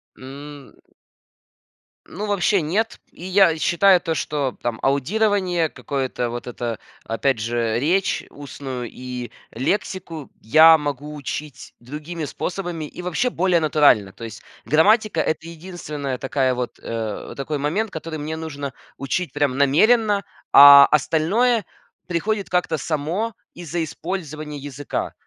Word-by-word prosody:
М. 140 +1 -11 1.3
Ну, 205 +5 -5
вообще 200 -1 +2
нет. 200 +9 -1
И - - -13
я 185 -3 +4
считаю 180 +3 +4
то, 165 - -2
что 145 -4 -2
там 120 -2 -3
аудирование 180 +4 +1
какое-то 130 -5 -3
вот 120 +1 -6
это, 120 -2 -4 0.2
опять 115 +2 0
же, 115 0 -1
речь 180 +7 +1
устную 135 -4 -7
и 125 -1 -7 0.2
лексику 165 - -3
я 160 +8 +7
могу 145 0 -4
учить 145 -1 -7
другими 150 +6 -7
способами 175 +1 -4
и 150 - -9
вообще 180 +8 0
более 185 -5 +2
натурально. 145 -11 +3
То - - -12
есть 115 -1 -8 0.2
грамматика- 205 +4 +3
это 160 +1 -2
единственная 155 -5 -6
такая 130 0 0
вот, 125 -1 -5
э, 110 -2 -5
такой 145 +2 -3
момент, 180 +10 -1
который 160 -1 -6
мне 155 +2 -4
нужно 145 -4 -6 0.2
учить 140 +6 -3
прям 145 -3 0
намеренно, 205 - +3 0.3
а 140 0 +11
остальное 190 - +2 0.4
приходит 200 +4 -1
как-то 180 -3 0
само 165 - -2 0.2
из-за 170 -1 -4
использования 155 -2 -5
языка. 145 0 -5
155 Hz, 125 wpm, -22 LUFS, 135-180 Hz, 1.3 s, а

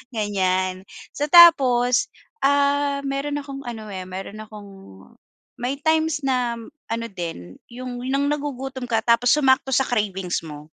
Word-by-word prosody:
ganiyan. 185 -3 -1 0.3
So, 295 +1 -1
tapos, 275 -3 +6 0.4
ah, 285 0 +2
meron 275 +1 -3
akong 275 -1 -8
ano, 220 -3 -7
eh, 185 -1 -6
meron 190 +3 -8
akong 210 -2 -11 0.9
may 250 +3 -2
times 315 -1 +1
na 250 -3 0 0.3
ano 230 0 -2
din, 165 - -7
yung 250 0 -7
nang 280 +1 +1
nagugutom 270 -3 -4
ka 225 -1 0
tapos 235 +1 +3
sumakto 265 -2 +2
sa 265 - +3
cravings 195 -6 -1
mo. 150 -1 -9
245 Hz, 135 wpm, -22 LUFS, 205-280 Hz, 0.9 s, tapos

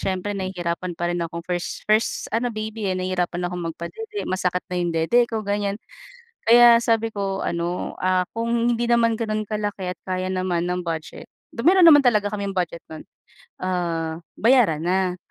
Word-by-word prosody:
siyempre 190 +2 -2
nahihirapan 185 -2 -3
pa 175 +1 -1
rin 175 - -2
akong 170 0 -5
first 175 0 -4
first 215 +2 +1
ano 235 +3 +1
baby, 215 -1 -4
eh, 185 - -1
nahihirapan 180 -1 -2
akong 180 -1 -5
magpadede. 420 - -6
Masakit 180 -1 0
na 180 - -3
yung 175 -1 -1
dede 165 +10 +3
ko, 225 -1 -2
ganyan. 200 0 -1 0.7
Kaya 235 0 +8
sabi 225 -1 +1
ko 195 -2 -3
ano, 170 +1 -3
ah, 185 0 +2
kung 230 +1 -2 0.2
hindi 235 +1 -1
naman 230 -1 +3
gano'n 215 -2 -2
kalaki 205 -3 -3
at 180 - -7
kaya 185 0 -2
naman 185 -2 -1
ng 180 0 -2
budget 160 -2 -5 0.2
though, 230 - -6
meron 365 +1 +6
naman 290 -4 +8
talaga 210 -4 +3
kaming 200 -1 -3
budget 175 -3 -2
no'n, 155 - -8 0.6
ah, 170 -3 -2 0.2
bayaran 225 - +4
na. 185 0 0
185 Hz, 175 wpm, -23 LUFS, 175-225 Hz, 0.7 s, Kaya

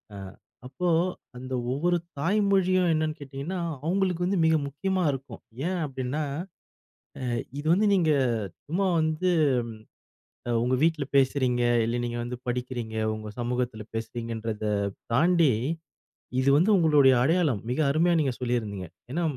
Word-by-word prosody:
அ - - -7 0.5
அப்போ 180 +7 -3 0.5
அந்த 130 +1 -6 0.2
ஒவ்வொரு 175 +6 +1 0.2
தாய்மொழியும் 185 0 +2
என்னன்னு 155 0 -1
கேட்டிங்கன்னா, 140 +6 -5 0.3
அவங்களுக்கு 180 -1 +1
வந்து 190 +2 +1
மிக 160 0 +4
முக்கியமா 185 +6 -1
இருக்கும். 135 0 -7 0.3
ஏன் 185 -1 -1
அப்படின்னா, 135 +2 -3 1.0
அ - - -1 0.3
இது 145 - -6
வந்து 205 +5 +3
நீங்க 165 -5 +3 0.5
சும்மா 185 +6 0
வந்து, 160 +3 +1 1.2
அ - - 0
உங்க 125 +2 +1
வீட்ல 160 -3 +1
பேசுறீங்க. 130 -2 +2 0.2
இல்ல 115 +2 -1
நீங்க 120 0 -3
வந்து 120 0 -5
படிக்கிறீங்க, 120 -2 -3 0.2
உங்க 110 0 -7
சமூகத்தில 120 -2 -2
பேசுறீங்கன்றத 115 -1 -4 0.5
தாண்டி 165 +1 +4 0.9
இது 130 - +1
வந்து 180 +7 +3
உங்களுடைய 150 -6 +5
அடையாளம். 155 - +2
மிக 125 - -1
அருமையா 165 +4 +3
நீங்க 135 -4 +1
சொல்லியிருந்திங்க. 110 -6 -2 0.2
ஏன்னா 170 +6 -1
140 Hz, 125 wpm, -27 LUFS, 125-175 Hz, 1.2 s, உங்களுடைய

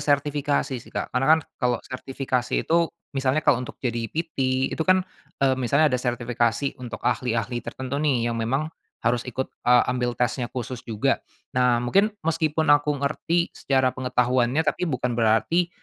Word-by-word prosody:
sertifikasi 145 -2 0
sih, - - -16
Kak. - - -4
Karena 125 +1 +1
kan - - -3 0.2
kalau 125 -1 +2
sertifikasi 130 -1 -2
itu, 170 0 +2 0.2
misalnya 135 +2 0
kalau 140 -5 +4
untuk 125 - -7
jadi 120 -2 -2
PT, 135 -5 -1
itu - - -5
kan, 185 +2 +3 0.4
eee, 135 - +4
misalnya 140 +3 +3
ada 125 - +1
sertifikasi 120 +1 0
untuk 120 -4 -7
ahli-ahli 120 -1 0
tertentu 130 +4 -4
nih, 135 -6 +1
yang 115 - -3
memang 135 +8 -1 0.3
harus 120 +1 +1
ikut, 130 +2 -4
eee, 125 0 +5
ambil 125 -1 -1
tesnya 120 0 0
khusus 125 0 -5
juga. 120 +3 0 0.3
Nah, 125 -1 +2
mungkin 195 - +3 0.2
meskipun 155 -2 +2
aku 145 0 +3
ngerti 160 +5 0
secara 130 -2 +1
pengetahuannya 125 +2 +1
tapi 160 +3 -1
bukan 125 -4 -1
berarti, 115 +10 +2
130 Hz, 160 wpm, -24 LUFS, 120-145 Hz, 0.4 s, eee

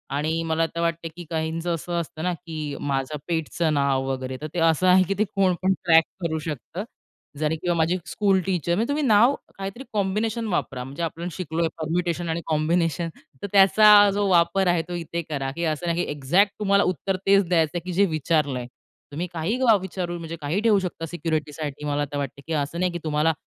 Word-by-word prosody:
आणि 160 +3 0
मला 165 0 0
आता 165 +1 -3
वाटतंय 165 0 -1
की 175 - -8
काहींचं 165 +1 -2
असं 170 +2 -5
असतं 160 -1 -8
ना, 180 0 0
की 160 -4 -6
माझं 140 +1 -2
पेटचं 165 -1 -1
नाव 140 -2 +1
वगैरे 130 -1 -3
तर 155 - -4
ते 175 - -2
असं 165 +2 +3
आहे 185 +1 +6
की 195 - +1
ते - - +5
कोण 190 -2 +3
पण 190 +1 +4
ट्रॅक 165 -2 +6 0.2
करू 160 -1 -1
शकतं. 155 +4 -5 0.6
जरी 155 +1 +1
किंवा 175 +2 -1
माझी 165 +3 +2
स्कूल 195 -1 +2
टीचर 175 -3 0
म्हणजे 225 +5 0
तुम्ही 295 +1 0
नाव 235 +1 +5 0.2
काहीतरी 195 +6 -6
कॉम्बिनेशन 215 +3 -1
वापरा 135 -9 -2
म्हणजे 140 +6 -6
आपण 165 +2 -4
शिकलोय 165 -1 -2
परम्युटेशन 170 +1 -1
आणि 165 +1 -1
कॉम्बिनेशन 165 +2 +1 0.3
तर - - -2
त्याचा 205 +1 +7
जो 205 0 +1
वापर 175 +2 +3
आहे, 175 -1 +3
तो 180 - -6
इथे 170 0 -4
करा. 135 -3 -2
की 170 +5 -5
असं 155 +1 -2
नाही 170 +1 +1
की - - -4
एक्झॅक्ट 170 +8 +2
तुम्हाला 200 -1 +3
उत्तर 185 +2 -1
तेच 195 0 +5
द्यायचंय 165 -1 +2
की 180 - -4
जे 200 +3 +4
विचारलंय. 150 -6 0 0.4
तुम्ही 160 +5 -3
काही 170 +8 -1 0.2
विचारू 180 -2 -4
म्हणजे 165 0 -6
काही 150 +7 -1
ठेवू 220 -2 +4
शकता 180 -3 -4
सिक्युरिटीसाठी. 150 -3 -3
मला 145 0 0
आता 145 0 -3
वाटतंय 140 -1 -4
की 165 - -2
असं 145 +2 -2
नाही 180 0 +1
की 175 - -4
तुम्हाला 155 +1 +1
170 Hz, 200 wpm, -24 LUFS, 155-185 Hz, 0.6 s, त्याचा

